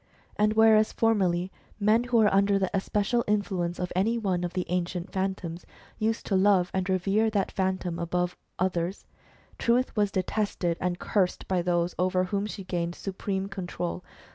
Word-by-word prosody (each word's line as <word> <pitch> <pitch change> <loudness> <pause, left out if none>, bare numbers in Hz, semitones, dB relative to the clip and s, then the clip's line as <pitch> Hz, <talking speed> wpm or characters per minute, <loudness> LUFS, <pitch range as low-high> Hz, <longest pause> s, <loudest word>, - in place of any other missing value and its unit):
And 210 +1 +2
whereas 220 -1 +5
formerly, 190 -5 +1 0.3
men 220 +3 +3
who 245 -1 +2
were 215 -3 +4
under 200 0 +4
the 190 -1 -1
especial 210 +4 0
influence 190 -4 0
of 180 - -3
any 220 +6 +2
one 190 -5 -1
of 175 - -3
the 180 -1 -1
ancient 180 0 -2
Phantoms, 190 -3 -3 0.4
used 220 +1 -1
to 195 - 0
love 190 -2 +4
and 190 0 -1
revere 195 +4 +2
that 205 -3 0
Phantom 185 -3 -1
above 180 +1 0 0.3
the - - +1
others, 180 +1 -2 0.5
Truth 245 +2 +1
was 205 -2 +2
detested 185 -2 -1
and 180 0 -1
cursed 190 -2 0
by 185 -2 +1
those 175 0 0
over 185 0 +2
whom 200 +2 -1
she 205 -2 -7
gained 175 -1 -2
supreme 195 0 -3
control. 180 -2 -4
190 Hz, 165 wpm, -27 LUFS, 180-210 Hz, 0.5 s, whereas